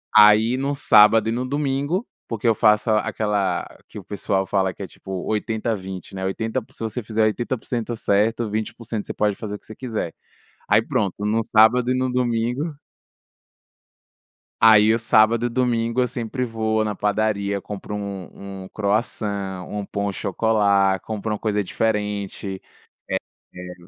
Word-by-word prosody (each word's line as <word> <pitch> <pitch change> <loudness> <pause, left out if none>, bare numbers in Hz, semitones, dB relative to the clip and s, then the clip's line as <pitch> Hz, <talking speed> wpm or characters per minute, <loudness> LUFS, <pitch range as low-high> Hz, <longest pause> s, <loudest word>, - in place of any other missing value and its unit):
Aí 110 +4 +7
no 140 +2 -1
sábado 110 -4 +6
e - - 0
no 125 +2 -2
domingo, 145 - -1 0.2
porque 115 -1 -2
eu 115 - +5
faço 105 +1 +3
aquela 105 -1 0 0.2
que - - -12
o - - -7
pessoal 95 0 -1
fala 95 -1 0
que - - -8
é 95 - -6
tipo 95 - -12 0.2
80 110 +1 -1
20, 95 -2 -8
né, 95 0 -4
80 110 +6 -2
se - - -14
você 115 +2 -3
fizer 110 0 0
80% 120 +1 -2
certo, 110 +2 +1
20% 110 0 -4
você - - -4
pode 105 -1 +1
fazer 105 -2 -5
o - - -9
que - - -20
você 110 - -10
quiser, 110 -9 -4 0.6
aí - - +5
pronto, 100 -4 -1
no 110 +2 +1
sábado 115 +4 +4
e 130 - +2
no 130 0 0
domingo 125 +5 -1 1.9
aí 110 0 +7
o 115 - +1
sábado 110 +1 +3
e - - 0
domingo 115 -1 0
eu 125 - +3
sempre 120 +1 -3
vou 110 -2 0
na 105 -1 -2
padaria, 100 -1 0
compro 105 +1 -7
um 100 -1 -7
um 95 - -10
croissant, 100 -3 -2
um 105 -1 -4
pain 100 +1 -3
au 100 - -1
chocolat, 100 -2 +2
compro 110 0 -4
uma 105 - -2
coisa 105 -2 0
diferente, 105 -2 -2 0.9
eh - - -11
eh, 90 0 -7
110 Hz, 165 wpm, -22 LUFS, 100-115 Hz, 1.9 s, Aí